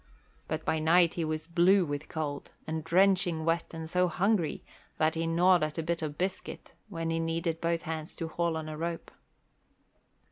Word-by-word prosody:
But -, -, -3 dB
by 160 Hz, -, +1 dB
night 165 Hz, +2 st, +4 dB
he 170 Hz, -, -2 dB
was 155 Hz, 0 st, -2 dB
blue 175 Hz, +3 st, +4 dB
with 145 Hz, -1 st, -3 dB
the -, -, -17 dB
cold, 145 Hz, -3 st, -4 dB, 0.2 s
and 160 Hz, 0 st, -3 dB
drenching 180 Hz, -2 st, +3 dB
wet 165 Hz, 0 st, 0 dB
and 160 Hz, -1 st, -6 dB
so 180 Hz, +2 st, +2 dB
hungry 185 Hz, 0 st, 0 dB, 0.3 s
that 155 Hz, 0 st, +2 dB
he 165 Hz, 0 st, -1 dB
gnawed 175 Hz, +1 st, +4 dB
at 155 Hz, +1 st, -2 dB
a 165 Hz, -, -1 dB
bit 170 Hz, +1 st, -1 dB
of 150 Hz, -2 st, -4 dB
biscuit 190 Hz, +1 st, -4 dB, 0.2 s
when 165 Hz, -4 st, -3 dB
he 165 Hz, -, 0 dB
needed 165 Hz, 0 st, -1 dB
both 170 Hz, -1 st, 0 dB
hands 160 Hz, -1 st, -5 dB
to 165 Hz, -, -4 dB
haul 170 Hz, 0 st, -1 dB
on 155 Hz, -1 st, -5 dB
a 155 Hz, -, -5 dB
rope. 165 Hz, +1 st, -4 dB
165 Hz, 190 wpm, -30 LUFS, 160-175 Hz, 0.3 s, night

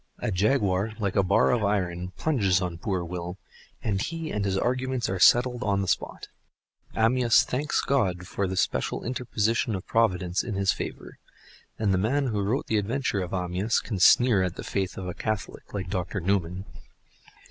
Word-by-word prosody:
A -, -, -2 dB
jaguar 100 Hz, 0 st, +1 dB
like 100 Hz, -4 st, -2 dB
a 100 Hz, -, +5 dB
bar 95 Hz, +1 st, +3 dB
of 120 Hz, -3 st, +1 dB
iron 90 Hz, -3 st, -1 dB
plunges 100 Hz, -12 st, +2 dB
on 90 Hz, -3 st, -4 dB
poor 95 Hz, -3 st, -2 dB
Will, 90 Hz, +1 st, -5 dB, 0.5 s
and 100 Hz, -3 st, 0 dB
he 165 Hz, +3 st, -4 dB
and 105 Hz, -, -1 dB
his 95 Hz, -1 st, 0 dB
arguments 130 Hz, +2 st, -1 dB
are 95 Hz, -, -2 dB
settled 125 Hz, +5 st, +5 dB
on 100 Hz, -3 st, +1 dB
the -, -, -4 dB
spot. -, -, -2 dB, 0.7 s
Amyas 120 Hz, +1 st, +4 dB
thanks 145 Hz, +4 st, -1 dB
God 95 Hz, -10 st, 0 dB
for 100 Hz, +1 st, -2 dB
this 95 Hz, +1 st, +1 dB
special -, -, -2 dB
interposition 115 Hz, -2 st, 0 dB
of 95 Hz, -, -6 dB
providence 95 Hz, -5 st, +1 dB
in 110 Hz, -, -4 dB
his 95 Hz, 0 st, +2 dB
favor. -, -, -7 dB, 0.6 s
And 105 Hz, -3 st, +1 dB
the 90 Hz, -, +2 dB
man 130 Hz, +7 st, +1 dB
who 105 Hz, -3 st, -1 dB
wrote 110 Hz, +7 st, -1 dB
the 110 Hz, -, 0 dB
adventure 110 Hz, -1 st, -1 dB
of 90 Hz, -, -5 dB
Amyas 90 Hz, +4 st, 0 dB
can 105 Hz, -5 st, -4 dB
sneer 115 Hz, +2 st, +6 dB
at 90 Hz, -1 st, -1 dB
the -, -, -7 dB
faith 95 Hz, -2 st, -3 dB
of 95 Hz, -, -5 dB
a 90 Hz, -, -3 dB
Catholic 110 Hz, +1 st, -4 dB
like 95 Hz, -3 st, -4 dB
Dr. 95 Hz, +2 st, -2 dB
Newman! 90 Hz, 0 st, -1 dB
100 Hz, 180 wpm, -26 LUFS, 95-115 Hz, 0.7 s, sneer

